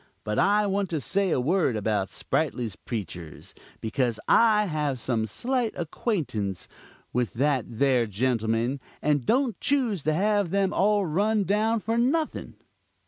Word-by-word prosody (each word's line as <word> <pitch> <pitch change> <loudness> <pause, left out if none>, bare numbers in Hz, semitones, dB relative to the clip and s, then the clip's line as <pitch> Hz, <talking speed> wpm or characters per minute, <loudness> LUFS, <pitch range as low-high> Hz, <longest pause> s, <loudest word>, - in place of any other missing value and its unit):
But 105 0 -1
I 205 +1 +3
want 200 -1 0
to 160 - -1
say 190 +7 0
a 160 - +1
word 155 -1 +1
about 105 -2 -1
Sprightly's 125 -8 -2
preachers, 90 -8 -7 0.3
because 115 0 -1
I 215 -2 +5
have 150 -7 -1
some 115 -2 -1
slight 245 - -1
acquaintance 150 - -2 0.5
with 125 -2 -1
that 135 -1 +1
there 125 0 +1
gentleman, 115 +3 0 0.2
and 145 -4 +1
don't 255 -2 +1
choose 250 - +1
to 155 - +2
have 205 +2 +1
them 195 +1 +1
all 205 0 +2
run 205 +6 +1
down 215 +3 +1
for 225 +2 0
nothing. 300 +6 -1
155 Hz, 140 wpm, -26 LUFS, -, 0.5 s, I